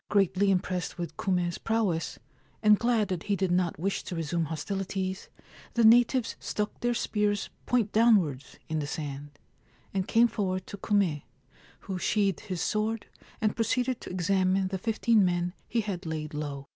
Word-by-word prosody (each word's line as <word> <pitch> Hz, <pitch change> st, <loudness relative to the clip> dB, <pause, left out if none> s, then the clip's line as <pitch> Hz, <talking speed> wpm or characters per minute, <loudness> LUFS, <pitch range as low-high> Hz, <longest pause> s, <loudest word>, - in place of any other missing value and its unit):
Greatly 195 Hz, 0 st, +3 dB
impressed 180 Hz, -1 st, -1 dB
with 175 Hz, -1 st, -5 dB
Kume's 180 Hz, -2 st, 0 dB
prowess, 215 Hz, -8 st, 0 dB, 0.5 s
and 210 Hz, -1 st, +6 dB
glad 230 Hz, -4 st, +2 dB
that 180 Hz, -3 st, -2 dB
he 200 Hz, -, +3 dB
did 190 Hz, -2 st, 0 dB
not 175 Hz, -1 st, +1 dB
wish 190 Hz, +5 st, -1 dB
to 180 Hz, -, -5 dB
resume 165 Hz, +1 st, -1 dB
hostilities, 190 Hz, +4 st, -3 dB, 0.5 s
the 235 Hz, -, +3 dB
natives 240 Hz, +2 st, +5 dB
stuck 210 Hz, 0 st, -3 dB
their 240 Hz, 0 st, 0 dB
spears 210 Hz, -3 st, 0 dB, 0.2 s
point 235 Hz, -5 st, +2 dB
downwards 190 Hz, -, +3 dB
in 155 Hz, 0 st, -1 dB
the 145 Hz, -, -3 dB
sand, 145 Hz, -1 st, -5 dB, 0.6 s
and 190 Hz, -1 st, -1 dB
came 235 Hz, +1 st, +5 dB
forward 185 Hz, -5 st, -2 dB
to -, -, -7 dB
Kume, 190 Hz, -7 st, +1 dB, 0.6 s
who 190 Hz, -2 st, -4 dB
sheathed 200 Hz, -2 st, +1 dB
his 185 Hz, -4 st, -5 dB
sword 215 Hz, +2 st, -1 dB, 0.4 s
and 215 Hz, -1 st, +1 dB
proceeded 245 Hz, +2 st, 0 dB
to -, -, -8 dB
examine 185 Hz, +1 st, +1 dB
the 190 Hz, 0 st, -3 dB
fifteen 225 Hz, +1 st, +3 dB
men 175 Hz, -1 st, 0 dB
he 230 Hz, -, 0 dB
had 195 Hz, -5 st, -4 dB
laid 155 Hz, -1 st, -4 dB
low. 145 Hz, -2 st, -5 dB
190 Hz, 160 wpm, -28 LUFS, 175-215 Hz, 0.6 s, and